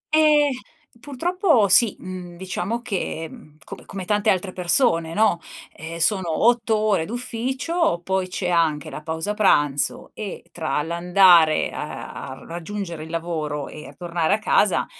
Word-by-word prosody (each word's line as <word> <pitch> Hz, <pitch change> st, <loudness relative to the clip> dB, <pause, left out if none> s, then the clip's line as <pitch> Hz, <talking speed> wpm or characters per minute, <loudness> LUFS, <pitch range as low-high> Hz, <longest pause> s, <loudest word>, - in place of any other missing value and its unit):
Eh, 300 Hz, -2 st, +5 dB, 0.5 s
purtroppo 295 Hz, -, +1 dB
sì. 215 Hz, +2 st, +5 dB
Mhmm, 180 Hz, -2 st, -8 dB
diciamo 190 Hz, +6 st, -3 dB
che, 190 Hz, -7 st, -3 dB
mhmm, 150 Hz, 0 st, -15 dB
com -, -, -10 dB
come 190 Hz, -2 st, -7 dB
tante 210 Hz, +2 st, +1 dB
altre 185 Hz, -1 st, 0 dB
persone, 170 Hz, -3 st, +2 dB
no, 210 Hz, -5 st, +3 dB, 0.4 s
ehm, 160 Hz, +2 st, -7 dB
sono 175 Hz, 0 st, +1 dB
8 235 Hz, -2 st, +3 dB
ore 210 Hz, -6 st, +1 dB
d'ufficio. 250 Hz, -, -1 dB
Poi 190 Hz, 0 st, -1 dB
c'è 180 Hz, 0 st, -3 dB
anche 160 Hz, -4 st, +1 dB
la -, -, -7 dB
pausa 160 Hz, +5 st, -3 dB
pranzo. 145 Hz, -9 st, +1 dB
E 210 Hz, -3 st, -7 dB
tra: 155 Hz, -3 st, -2 dB
l'andare 170 Hz, -1 st, +4 dB
a -, -, -6 dB, 0.2 s
a 130 Hz, -, -10 dB
raggiungere 170 Hz, -1 st, -6 dB
il -, -, -12 dB
lavoro, 160 Hz, -4 st, -3 dB
e 155 Hz, -, -10 dB
a -, -, -12 dB
tornare 170 Hz, 0 st, 0 dB
a -, -, -3 dB
casa, 210 Hz, -2 st, +2 dB
185 Hz, 150 wpm, -22 LUFS, 165-220 Hz, 0.5 s, Eh